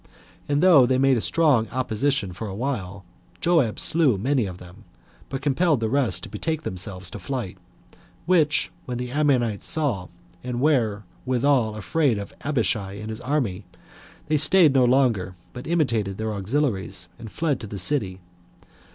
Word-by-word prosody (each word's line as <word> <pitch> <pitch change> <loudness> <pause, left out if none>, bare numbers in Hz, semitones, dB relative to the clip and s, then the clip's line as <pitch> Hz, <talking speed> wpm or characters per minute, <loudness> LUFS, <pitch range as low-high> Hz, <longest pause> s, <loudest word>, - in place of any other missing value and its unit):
And 145 +2 +1
though 155 -9 +7
they 130 0 +2
made 135 0 +4
a - - -1
strong 145 -8 +3
opposition 125 -4 -1
for 110 +5 -6
a 95 - -6
while, 100 -6 -4 0.3
Joab 160 -11 +2
slew 150 -10 +4
many 125 +1 0
of 90 -1 -7
them, 90 -1 -14 0.5
but 135 0 -5
compelled 150 0 +2
the 110 -1 -1
rest 120 -10 0
to - - -7
betake 160 -1 -3
themselves 95 -1 -5
to 105 - -7
flight; 115 -2 -4 0.7
which, 160 -4 +2 0.2
when 125 -1 -3
the 125 0 -5
Ammonites 130 -8 +1
saw, 130 - -1 0.4
and 125 -1 -3
were 120 -8 +1 0.2
withal 130 -3 +1
afraid 120 - 0
of 100 -1 -7
Abishai 110 -8 -1
and 110 +2 -7
his 110 +2 -6
army, 125 -9 -1 0.6
they 155 0 +1
staid 155 0 +5
no 130 -2 +4
longer, 120 -8 +2 0.2
but 125 +2 -8
imitated 115 - 0
their 110 0 -3
auxiliaries, 100 -4 -2
and 115 -2 -9
fled 155 -5 -1
to 110 - -7
the 100 - -7
city. 95 -3 0
125 Hz, 160 wpm, -24 LUFS, 100-145 Hz, 0.7 s, though